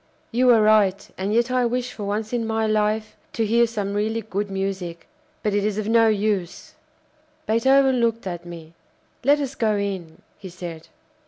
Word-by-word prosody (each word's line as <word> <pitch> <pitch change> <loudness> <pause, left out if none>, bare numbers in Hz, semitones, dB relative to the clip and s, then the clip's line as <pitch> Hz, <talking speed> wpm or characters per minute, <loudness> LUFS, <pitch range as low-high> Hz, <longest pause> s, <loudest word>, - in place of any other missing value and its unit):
"You 250 +2 +3
are 225 -3 +6
right, 205 -2 +3
and 195 +2 -3
yet 235 +3 +2
I 255 0 +2
wish 250 +1 -2
for 205 - -6
once 215 +3 -3
in 230 -2 -1
my 220 0 0
life 215 0 0 0.2
to 225 - 0
hear 235 +2 +3
some 205 -3 -3
really 220 +2 -1
good 205 -1 -3
music. 190 -3 -4 0.4
But 210 - 0
it 205 0 +1
is 210 -1 -1
of 215 -1 -2
no 225 0 +5
use." 205 -4 -1 0.7
Beethoven 265 +3 +3
looked 230 -2 0
at 175 -2 -5
me. 170 -2 -10 0.5
"Let 285 +3 +4
us 275 -2 -3
go 220 -5 +1
in," 190 -5 -4 0.2
he 190 - -9
said. 170 -2 -8
215 Hz, 180 wpm, -23 LUFS, 195-230 Hz, 0.7 s, are